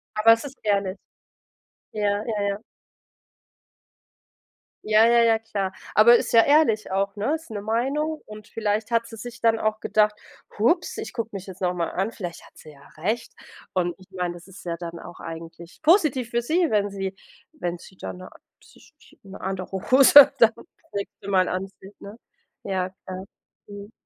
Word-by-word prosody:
Aber 225 +2 +6
es 230 +4 +1
ist 275 -1 -9
ehrlich. 200 -2 0 1.0
Ja, 205 0 0
ja, 210 -3 -2
ja. 200 - -2 2.3
Ja, 215 +1 +5
ja 235 0 +5
ja, 225 -1 +4
klar. 200 -4 -3 0.2
Aber 235 +3 +8
ist - - -2
ja 230 -1 +7
ehrlich 255 -9 +3
auch, 195 +1 -1
ne? 220 +9 -1
Ist 320 -6 -15
'ne 205 -2 -5
Meinung, 275 +8 -1
und 215 0 -11
vielleicht 215 +1 -2
hat 230 0 +1
sie 225 - -10
sich 240 +3 -9
dann 225 -1 +2
auch 215 0 0
gedacht: 215 -1 +2 0.5
„Ups, 335 - +1
ich - - -6
gucke 230 -2 -4
mich 195 -1 -7
jetzt 190 0 -10
noch 180 -1 +1
mal 170 -2 -2
an, 195 +4 -1
vielleicht 175 -7 -7
hat - - -19
sie 155 - -13
ja 140 0 -18
recht.“ 220 - -2 0.4
Und 175 -2 0
ich 185 - -19
meine, 180 -2 -3
das 175 +2 -13
ist 190 0 -13
ja 170 -1 -3
dann 170 0 -7
auch - - -11
eigentlich 165 +1 -10
positiv 305 - +3
für 235 0 0
sie, 335 +7 +2
wenn 205 -1 +1
sie 195 -1 -4 0.4
wenn 175 - -4
sie 190 - -16
dann - - -7
'ne 185 - -10 0.3
sich - - -20 0.3
'ne 195 -1 -11
andere 190 -1 -4 0.2
Hose 275 +1 +9
dann 225 -1 +7 0.4
nächste 200 0 -6
Mal 185 -2 +3
anzieht, 195 +2 -6
ne? 205 +3 -10 0.5
Ja, 185 -2 -1 0.2
klar, 185 0 -6 0.4
mhm. 205 +1 -10
205 Hz, 175 wpm, -24 LUFS, 190-230 Hz, 2.3 s, Hose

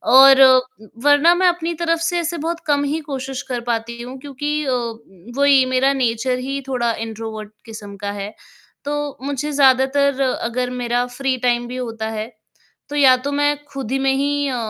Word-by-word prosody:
और 270 0 +8
उम, 255 -4 +4 0.2
वरना 290 +4 +5
मैं 365 +1 +3
अपनी 340 -1 0
तरफ 330 0 +1
से 345 +1 0
ऐसे 340 0 -3
बहुत 340 0 -2
कम 285 -1 +2
ही 290 +3 -1
कोशिश 270 -1 -5
कर 245 -1 -2
पाती 235 +1 -4
हूँ 250 +2 -8
क्योंकि 295 +2 -3
अ, 265 - -1
उम, 230 -4 -6
वही 280 -2 +5
मेरा 255 +2 +2
नेचर 250 -1 0
ही 275 +2 -4
थोड़ा 240 -3 0
इंट्रोवर्ट 220 -1 -7
किस्म 215 -3 -9
का 200 0 -4
है, 205 +1 -6 0.5
तो 295 0 -3
मुझे 285 +1 -3
ज़्यादातर 275 0 +3
अगर 250 -1 -1
मेरा 245 0 -1
फ्री 260 +1 -2
टाइम 240 -1 0
भी 250 - -7
होता 225 -3 -4
है, 215 -1 -4 0.6
तो 295 - -5
या 265 -3 +6
तो 265 +3 -5
मैं 290 +1 +1 0.2
खुद 265 -4 -5
में 270 0 +2
ही 285 +1 0
अ, 260 - -2
260 Hz, 185 wpm, -20 LUFS, 235-285 Hz, 0.6 s, और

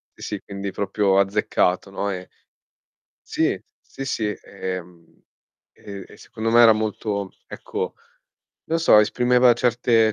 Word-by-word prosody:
sì, 105 -2 -6
quindi 100 0 -5
proprio 100 0 +1
azzeccato, 95 -1 +1
no, 100 +1 -2
e 90 -1 -5 1.0
Sì, - - 0 0.2
sì, 135 - -8
sì 115 -4 -2
e, 95 -2 -5
mhmm, 85 -1 -22 0.5
e 100 -1 -9
e - - -14
secondo 115 +1 -4
me 120 - +6
era 115 -2 +8
molto, 105 -2 -3 0.2
ecco, - - -5 0.7
non 165 +1 -1
so 160 -9 +6
esprimeva 125 +3 +4
certe 115 -2 +2
105 Hz, 130 wpm, -23 LUFS, 95-115 Hz, 1.0 s, era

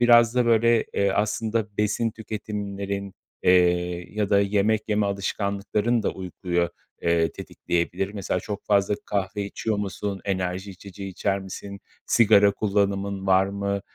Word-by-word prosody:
biraz 120 -1 +6
da, 125 -1 +2
böyle, 115 0 +4
eee, 100 0 +2
aslında 110 +1 -1
besin 105 +2 +1
tüketimlerin, 100 -2 -5 0.3
eee, 90 0 +2
ya 105 -2 -1
da 100 -1 +5
yemek 105 +2 +2
yeme 105 -1 +2
alışkanlıkların 100 +3 -1
da - - +1
uykuyu, 90 -1 -2 0.3
eee, 85 -2 +2
tetikleyebilir. 90 +3 -2
Mesela 95 -2 -2
çok 100 +2 -6
fazla 100 0 +3
kahve 100 +1 -2
içiyor 105 +2 -2
musun, 100 -1 -3
enerji 95 0 -2
içeceği 95 +1 -9
içer 100 +1 -1
misin, 100 +1 -8 0.3
sigara 105 -3 +5
kullanımın 100 -1 -1
var 95 0 +4
mı, 100 0 -2
100 Hz, 135 wpm, -25 LUFS, 95-105 Hz, 0.3 s, biraz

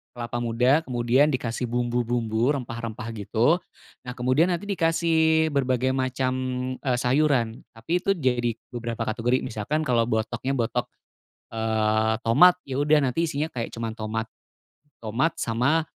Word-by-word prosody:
Kelapa 120 0 -4
muda 125 +5 +3
kemudian 125 +3 +3
dikasih 120 0 -2
bumbu-bumbu, 120 +1 0
rempah-rempah 115 -2 -5
gitu. 115 - +2 0.5
Nah, 125 - -5
kemudian 130 +7 +2
nanti 175 +3 -2
dikasih 160 -2 +2
berbagai 130 -2 +1
macam, 130 0 -1 0.5
eee, 130 -3 0
sayuran, 125 -3 +1 0.2
tapi 165 +10 -1
itu 195 +2 +1
jadi 125 -6 0 0.2
beberapa 115 -1 -4
kategori. 120 +3 0
Misalkan 130 +7 -2
kalau 120 -5 +1
botoknya 120 +4 -1
botok, 120 0 -1 0.7
eee, 110 0 +1
tomat, 180 +11 +6
ya 130 - -4
udah 150 +1 +4
nanti 165 +6 0
isinya 150 +2 -1
kayak 115 -2 -4
cuma 115 -1 -3
tomat, 110 0 -3 0.8
tomat 125 +9 0
sama 135 +8 +1
125 Hz, 130 wpm, -25 LUFS, 115-145 Hz, 0.8 s, tomat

